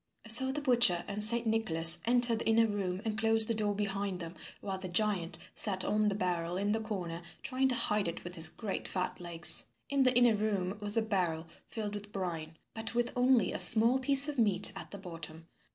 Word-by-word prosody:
So 260 Hz, +4 st, +6 dB
the 295 Hz, +2 st, -5 dB
butcher 240 Hz, -10 st, +4 dB
and 205 Hz, +1 st, -1 dB
Saint 235 Hz, +2 st, +1 dB
Nicholas 170 Hz, -8 st, 0 dB
entered 240 Hz, -1 st, +2 dB
the -, -, -6 dB
inner 225 Hz, 0 st, +2 dB
room 200 Hz, -2 st, -5 dB
and 220 Hz, -1 st, -3 dB
closed 225 Hz, 0 st, +3 dB
the 230 Hz, -, -1 dB
door 210 Hz, -2 st, -3 dB
behind 200 Hz, -2 st, -5 dB
them 165 Hz, -1 st, -8 dB, 0.3 s
while 195 Hz, -2 st, -7 dB
the 190 Hz, -, -7 dB
giant 180 Hz, -2 st, -1 dB, 0.2 s
sat 190 Hz, -3 st, -1 dB
on 215 Hz, 0 st, -1 dB
the 200 Hz, -, -2 dB
barrel 175 Hz, -2 st, -4 dB
in 200 Hz, +2 st, -2 dB
the 220 Hz, -, -1 dB
corner, 185 Hz, -6 st, -7 dB, 0.2 s
trying 265 Hz, 0 st, -1 dB
to 255 Hz, -, -1 dB
hide 210 Hz, -4 st, -1 dB
it 170 Hz, -, -7 dB
with 175 Hz, -, -10 dB
his 160 Hz, -2 st, +4 dB
great 195 Hz, +4 st, -7 dB
fat 185 Hz, -1 st, -5 dB
legs. 170 Hz, -1 st, +6 dB, 0.3 s
In 280 Hz, -1 st, 0 dB
the 255 Hz, -2 st, +1 dB
inner 245 Hz, -2 st, +3 dB
room 205 Hz, -3 st, -3 dB
was 205 Hz, +1 st, -1 dB
a 225 Hz, -, +1 dB
barrel 180 Hz, -6 st, -3 dB, 0.2 s
filled 210 Hz, -2 st, -7 dB
with 205 Hz, 0 st, -9 dB
brine, 165 Hz, -5 st, -7 dB, 0.2 s
but 225 Hz, +1 st, -4 dB
with 240 Hz, 0 st, -2 dB
only 250 Hz, -1 st, +1 dB
a -, -, -3 dB
small 235 Hz, +3 st, +5 dB
piece 275 Hz, +2 st, +7 dB
of 290 Hz, -3 st, -5 dB
meat 205 Hz, -3 st, +3 dB
at 195 Hz, -, -9 dB
the 200 Hz, -, -10 dB
bottom. 165 Hz, -3 st, -10 dB
210 Hz, 215 wpm, -30 LUFS, 180-230 Hz, 0.3 s, piece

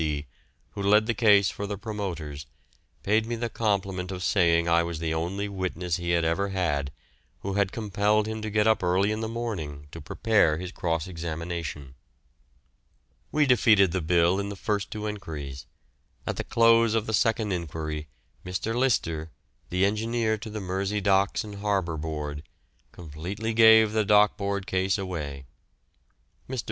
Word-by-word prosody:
C., 75 Hz, -2 st, -2 dB, 0.5 s
who -, -, -6 dB
led 105 Hz, +2 st, +4 dB
the 120 Hz, -, 0 dB
case 105 Hz, -3 st, +4 dB
for 100 Hz, -, -5 dB
the 100 Hz, 0 st, -4 dB
promoters, 85 Hz, -9 st, -5 dB, 0.6 s
paid 110 Hz, +2 st, +2 dB
me 120 Hz, -, -2 dB
the 115 Hz, 0 st, -3 dB
compliment 95 Hz, -4 st, -1 dB
of 90 Hz, -1 st, -5 dB
saying 85 Hz, -3 st, +3 dB
I 85 Hz, 0 st, +4 dB
was 85 Hz, -1 st, -3 dB
the 80 Hz, 0 st, -2 dB
only 90 Hz, +5 st, -2 dB
witness 90 Hz, -3 st, -2 dB
he 85 Hz, -1 st, -4 dB
had 85 Hz, -1 st, +2 dB
ever 95 Hz, +5 st, 0 dB
had 75 Hz, -7 st, -1 dB, 0.5 s
who 100 Hz, -, -3 dB
had 100 Hz, -1 st, +1 dB
compelled 105 Hz, 0 st, +1 dB
him 110 Hz, 0 st, -4 dB
to 110 Hz, -, -3 dB
get 105 Hz, 0 st, +2 dB
up 110 Hz, 0 st, +3 dB
early 95 Hz, +3 st, +2 dB
in 110 Hz, -, -2 dB
the 110 Hz, -, -2 dB
morning 90 Hz, -12 st, -5 dB
to -, -, -9 dB
prepare 100 Hz, -9 st, +2 dB
his 90 Hz, +1 st, -6 dB
cross 80 Hz, -4 st, -2 dB
examination. 85 Hz, -5 st, -5 dB, 1.4 s
We 150 Hz, -1 st, +3 dB
defeated 110 Hz, -8 st, +5 dB
the 95 Hz, 0 st, -1 dB
bill 85 Hz, +3 st, +3 dB
in 100 Hz, 0 st, -3 dB
the 100 Hz, -, -5 dB
first 100 Hz, +1 st, -2 dB
two 105 Hz, -1 st, -5 dB
enquiries. 75 Hz, -10 st, -6 dB, 0.6 s
At -, -, -3 dB
the -, -, -2 dB
close 115 Hz, -1 st, +4 dB
of 110 Hz, -1 st, 0 dB
the 110 Hz, -, -3 dB
second 110 Hz, 0 st, +1 dB
enquiry 80 Hz, -3 st, -4 dB, 0.4 s
Mr. 95 Hz, +5 st, -3 dB
Lyster, 85 Hz, -11 st, 0 dB, 0.4 s
the 90 Hz, +2 st, +2 dB
engineer 110 Hz, +2 st, 0 dB
to 110 Hz, +1 st, -8 dB
the 110 Hz, 0 st, -5 dB
Mersey 95 Hz, +2 st, -2 dB
Docks 100 Hz, -1 st, +2 dB
and 105 Hz, -2 st, -8 dB
Harbour 100 Hz, -5 st, 0 dB
Board, 75 Hz, -1 st, -4 dB, 0.5 s
completely 90 Hz, +8 st, -5 dB
gave 110 Hz, -1 st, +7 dB
the 110 Hz, 0 st, +1 dB
Dock 105 Hz, 0 st, +4 dB
Board 100 Hz, -1 st, -2 dB
case 95 Hz, +2 st, 0 dB
away. 75 Hz, -8 st, -5 dB, 1.0 s
Mr. 130 Hz, -1 st, -3 dB
95 Hz, 165 wpm, -26 LUFS, 85-105 Hz, 1.4 s, gave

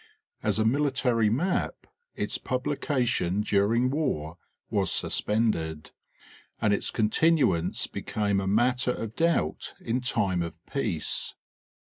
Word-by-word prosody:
As 105 Hz, -2 st, +1 dB
a 110 Hz, -, +2 dB
military 125 Hz, -3 st, +2 dB
map 165 Hz, -, -1 dB, 0.3 s
its -, -, -2 dB
publication 125 Hz, -, 0 dB
during 110 Hz, +5 st, +2 dB
war 90 Hz, -, -2 dB, 0.3 s
was -, -, +1 dB
suspended, 85 Hz, -9 st, 0 dB, 0.7 s
and 105 Hz, -1 st, +2 dB
its 100 Hz, -, 0 dB
continuance 110 Hz, -, +2 dB
be -, -, -6 dB
came 100 Hz, -2 st, 0 dB
a 95 Hz, -, -3 dB
matter 125 Hz, +4 st, +2 dB
of 115 Hz, -1 st, -6 dB
doubt 165 Hz, -, 0 dB
in 120 Hz, +3 st, -2 dB
time 100 Hz, -7 st, 0 dB
of 85 Hz, -1 st, -5 dB
peace. 110 Hz, -, -1 dB
110 Hz, 115 wpm, -27 LUFS, 100-130 Hz, 0.7 s, a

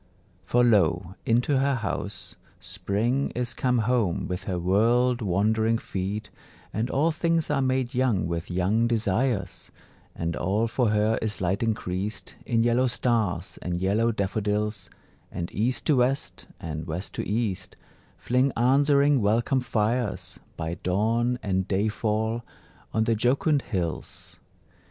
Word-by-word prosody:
For 120 Hz, 0 st, +2 dB
lo, 90 Hz, -6 st, +3 dB
into 125 Hz, +4 st, +3 dB
her 140 Hz, 0 st, +2 dB
house 100 Hz, -3 st, -4 dB, 0.2 s
Spring 120 Hz, +7 st, -1 dB
is 120 Hz, -1 st, -1 dB
come 125 Hz, -1 st, +1 dB
home 115 Hz, -5 st, +1 dB
with 90 Hz, -1 st, -4 dB
her 90 Hz, -3 st, -2 dB
world 120 Hz, +7 st, +2 dB
wandering 110 Hz, +4 st, +2 dB
feet, 100 Hz, 0 st, -4 dB, 0.4 s
And 115 Hz, +4 st, -1 dB
all 155 Hz, +5 st, +2 dB
things 165 Hz, 0 st, 0 dB
are 140 Hz, -2 st, +2 dB
made 130 Hz, -1 st, 0 dB
young 120 Hz, -9 st, +1 dB
with 85 Hz, 0 st, -3 dB
young 95 Hz, +6 st, +1 dB
desires; 115 Hz, -2 st, -1 dB, 0.5 s
And 85 Hz, 0 st, -2 dB
all 105 Hz, +6 st, 0 dB
for 120 Hz, 0 st, +1 dB
her 105 Hz, +1 st, +2 dB
is 110 Hz, -1 st, -2 dB
light 95 Hz, +2 st, 0 dB
increased 105 Hz, -2 st, -2 dB
In 115 Hz, -1 st, +2 dB
yellow 120 Hz, +2 st, +3 dB
stars 115 Hz, -6 st, -1 dB
and 90 Hz, 0 st, -2 dB
yellow 105 Hz, +6 st, +2 dB
daffodils, 105 Hz, 0 st, -2 dB, 0.4 s
And 85 Hz, -1 st, -5 dB
East 120 Hz, +5 st, -1 dB
to 150 Hz, -, +3 dB
West, 130 Hz, +3 st, 0 dB
and 80 Hz, -2 st, -5 dB
West 85 Hz, +4 st, -5 dB
to -, -, -3 dB
East, 100 Hz, -4 st, -2 dB, 0.4 s
Fling 130 Hz, +3 st, +1 dB
answering 140 Hz, +2 st, +4 dB
welcome 115 Hz, +6 st, +2 dB
fires, 120 Hz, -1 st, -1 dB, 0.2 s
By 80 Hz, +1 st, -4 dB
dawn 115 Hz, +6 st, +1 dB
and 95 Hz, -2 st, 0 dB
day 100 Hz, +2 st, +1 dB
fall, 110 Hz, +2 st, -1 dB, 0.5 s
on 110 Hz, -, +1 dB
the 115 Hz, 0 st, +2 dB
jocund 135 Hz, +6 st, +2 dB
hills. 90 Hz, -10 st, -5 dB
110 Hz, 135 wpm, -26 LUFS, 95-125 Hz, 0.5 s, answering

